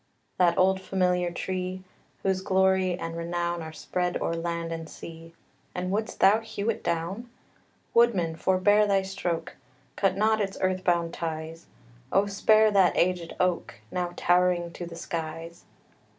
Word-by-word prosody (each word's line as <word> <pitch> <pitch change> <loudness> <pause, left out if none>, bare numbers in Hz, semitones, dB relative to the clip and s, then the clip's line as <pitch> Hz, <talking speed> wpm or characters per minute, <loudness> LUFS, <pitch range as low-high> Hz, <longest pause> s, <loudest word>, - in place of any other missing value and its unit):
That 175 -2 +4
old 190 +1 +3
familiar 180 -2 +1
tree, 185 +1 -4 0.4
Whose 190 -1 +1
glory 190 -1 +2
and 165 -2 -5
renown 170 0 -2
Are 160 0 -7
spread 180 +3 -2
o'er - - -1
land 170 0 -3
and 165 -1 -5
sea 165 0 -11 0.4
And 180 +1 -2
wouldst 215 +2 -2
thou 210 +3 +6
hew 225 -1 -2
it - - -8
down? 175 +8 -2 0.6
Woodman, 195 -9 +3
forebear 205 +5 +3
thy 195 -1 +2
stroke! 180 -4 -4 0.4
Cut 195 -1 +1
not 220 +1 +2
its 195 -1 -3
earth 185 0 0
bound 170 -1 +1
ties; 160 0 -5 0.4
Oh, 195 +2 +4
spare 215 +2 +4
that 190 -3 +4
aged 175 -1 0
oak, 180 -1 0 0.2
Now 175 -1 -2
towering 175 -1 +2
to 175 0 -7
the 170 - -9
skies! 165 0 -6
180 Hz, 150 wpm, -27 LUFS, 170-190 Hz, 0.6 s, thou